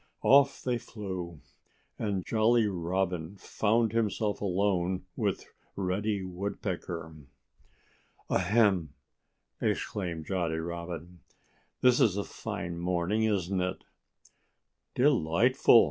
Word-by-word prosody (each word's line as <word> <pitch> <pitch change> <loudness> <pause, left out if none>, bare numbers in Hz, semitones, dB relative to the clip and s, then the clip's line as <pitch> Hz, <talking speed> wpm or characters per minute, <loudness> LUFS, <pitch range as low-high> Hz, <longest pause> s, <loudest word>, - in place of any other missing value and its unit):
Off 140 0 +5
they 125 -2 0
flew. 95 - -6 0.6
And 100 -4 -1
Jolly 115 +1 +3
Robin 90 -1 -2
found 110 +4 +1
himself 105 -2 0
alone 95 -2 0
with - - -1 0.3
Reddy 100 +2 -1
Woodpecker. 90 -3 -4 1.1
"Ahem!" 95 -6 +2 0.7
exclaimed 85 -6 -2
Jolly 85 -2 -1
Robin. 85 +1 -6 0.6
"It's 125 -1 +6
a 100 -6 +3
fine 85 -3 -5
morning, 90 +5 0
isn't 95 -3 0
it?" 90 0 -3 1.1
"Delightful!" 125 - +5
95 Hz, 85 wpm, -29 LUFS, 85-110 Hz, 1.1 s, It's